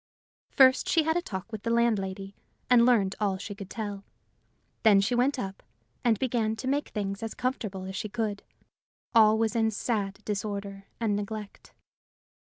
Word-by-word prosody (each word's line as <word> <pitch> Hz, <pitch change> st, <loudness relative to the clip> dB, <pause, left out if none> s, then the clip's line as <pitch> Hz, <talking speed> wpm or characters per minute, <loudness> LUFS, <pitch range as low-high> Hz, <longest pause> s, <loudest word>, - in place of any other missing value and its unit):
First 260 Hz, -1 st, +5 dB
she 325 Hz, -, +4 dB
had 320 Hz, +1 st, +1 dB
a 350 Hz, -, +1 dB
talk 195 Hz, -, -6 dB
with 215 Hz, -2 st, -5 dB
the 230 Hz, -, -3 dB
landlady, 200 Hz, -4 st, 0 dB, 0.4 s
and 240 Hz, -1 st, +7 dB
learned 205 Hz, -6 st, +3 dB
all 200 Hz, -3 st, 0 dB
she 200 Hz, +2 st, -6 dB
could 195 Hz, -1 st, -9 dB
tell. 205 Hz, -3 st, -5 dB, 0.8 s
Then 210 Hz, -3 st, +6 dB
she 200 Hz, +5 st, +1 dB
went 255 Hz, +4 st, +2 dB
up, 195 Hz, -5 st, -5 dB, 0.4 s
and 230 Hz, -3 st, +3 dB
began 230 Hz, -2 st, 0 dB
to 240 Hz, +4 st, -6 dB
make 285 Hz, +2 st, 0 dB
things 200 Hz, -1 st, -3 dB
as 225 Hz, -1 st, -5 dB
comfortable 220 Hz, -7 st, -3 dB
as 190 Hz, 0 st, -6 dB
she 215 Hz, -, -3 dB
could: 215 Hz, -2 st, -2 dB, 0.7 s
all 220 Hz, -2 st, +6 dB
was 225 Hz, +1 st, 0 dB
in 225 Hz, -1 st, +3 dB
sad 205 Hz, -2 st, -2 dB
disorder 200 Hz, -1 st, -4 dB
and 220 Hz, -3 st, +1 dB
neglect. 205 Hz, 0 st, -6 dB
215 Hz, 165 wpm, -28 LUFS, 200-235 Hz, 0.8 s, and